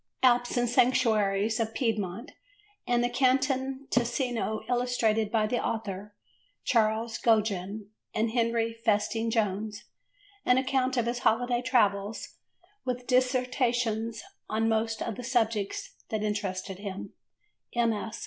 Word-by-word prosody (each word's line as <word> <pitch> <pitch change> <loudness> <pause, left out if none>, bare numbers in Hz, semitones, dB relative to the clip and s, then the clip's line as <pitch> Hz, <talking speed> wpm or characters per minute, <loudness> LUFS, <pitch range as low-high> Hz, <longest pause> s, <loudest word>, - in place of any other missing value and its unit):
Alps 245 0 +4
and 245 0 +2
Sanctuaries 220 -4 +2
of 225 0 -2
Piedmont 220 - -2 0.6
and 240 0 +2
the - - +3
Canton 265 +1 +1
Ticino 240 -2 0
illustrated 235 -3 +1
by 220 -2 +2
the 240 +3 -1
author, 205 -2 -4 0.5
Charles 225 0 +1
Gogin 210 -2 +1 0.2
and 225 +1 0
Henry 230 -1 +1
Festing 225 0 0
Jones: 210 -1 -1 0.6
an 250 - +4
account 260 0 +1
of 240 - +2
his 240 +1 -1
holiday 245 +1 +2
travels 210 -5 0 0.5
with 250 -1 -3
dissertations 250 -3 +1 0.3
on 220 +1 +1
most 225 0 0
of 225 - -4
the 250 - -6
subjects 225 -5 -1 0.2
that 215 -1 -2
interested 195 -2 -3
him: 200 -2 -6 0.6
MS. 225 -2 0
230 Hz, 120 wpm, -28 LUFS, 215-245 Hz, 0.6 s, Alps